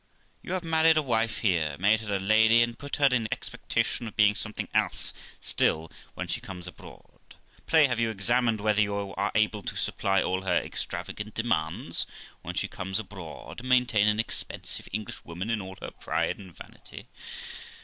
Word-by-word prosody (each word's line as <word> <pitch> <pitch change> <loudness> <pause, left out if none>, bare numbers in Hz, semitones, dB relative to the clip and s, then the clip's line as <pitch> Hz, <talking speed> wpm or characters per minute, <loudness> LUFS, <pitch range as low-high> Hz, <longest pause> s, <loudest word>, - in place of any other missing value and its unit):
You 180 - -5
have 185 -1 -1
married 160 -1 +5
a - - +5
wife 115 -3 +1
here, 85 -8 +1
made 105 +4 +4
her 105 -2 -2
a - - 0
lady, 110 +4 +5
and 120 0 -2
put 145 +3 -5
her 145 - +3
in 125 -5 +3
expectation 120 - -1
of 110 - -9
being 105 -1 +5
something 105 +1 -3
else - - +1 0.3
still 80 +1 +1 0.2
when - - -4
she - - -2
comes 90 -2 -6
abroad. 90 - -11 0.5
Pray 160 -2 +6
have 120 -3 0
you 115 -1 +2
examined 115 +1 +1
whether 105 0 +3
you 100 -1 +1 0.2
are 100 +4 -1
able 105 -1 +2
to - - -5
supply 95 0 +1
all 95 +1 0
her 90 -2 +1
extravagant 105 +4 -3
demands 115 -10 0 0.3
when - - -6
she - - 0
comes 95 +1 -3
abroad, 95 -5 -7
and 130 +1 -7
maintain 125 -5 +4
an 105 0 +3
expensive 115 - -3
English 105 +1 -5
woman 90 +6 -4
in 115 -2 0
all 95 0 -8
her - - -6
pride - - -2
and 95 -5 -12
vanity? - - -11
110 Hz, 180 wpm, -28 LUFS, 95-120 Hz, 0.5 s, Pray